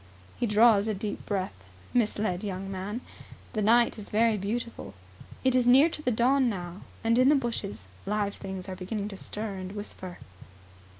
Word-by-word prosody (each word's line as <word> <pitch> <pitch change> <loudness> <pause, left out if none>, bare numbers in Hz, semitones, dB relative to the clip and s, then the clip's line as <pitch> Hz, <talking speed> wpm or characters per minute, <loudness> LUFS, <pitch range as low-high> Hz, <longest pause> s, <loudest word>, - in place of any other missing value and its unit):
He 240 - +1
draws 210 -1 +5
a 215 - 0
deep 205 +2 -4
breath, 195 -2 -1 0.4
misled 210 -5 +1
young 195 -1 -4
man. 200 +5 -4 0.5
The 215 - 0
night 230 +2 +4
is 205 - -9
very 225 +1 +3
beautiful. 205 - -4 0.5
It 260 -1 +3
is 250 -1 +3
near 270 +6 +7
to 305 - -6
the 255 - +1
dawn 250 +3 +3
now 180 -2 -5 0.2
and 230 +1 +3
in 255 +2 +6
the 300 - +6
bushes 230 - -3 0.2
live 205 -1 0
things 190 -2 -7
are 190 - -4
beginning 200 +3 -4
to 195 - -8
stir 210 +1 -4
and 185 +1 -6
whisper. 190 -3 -7
210 Hz, 175 wpm, -28 LUFS, 195-235 Hz, 0.5 s, near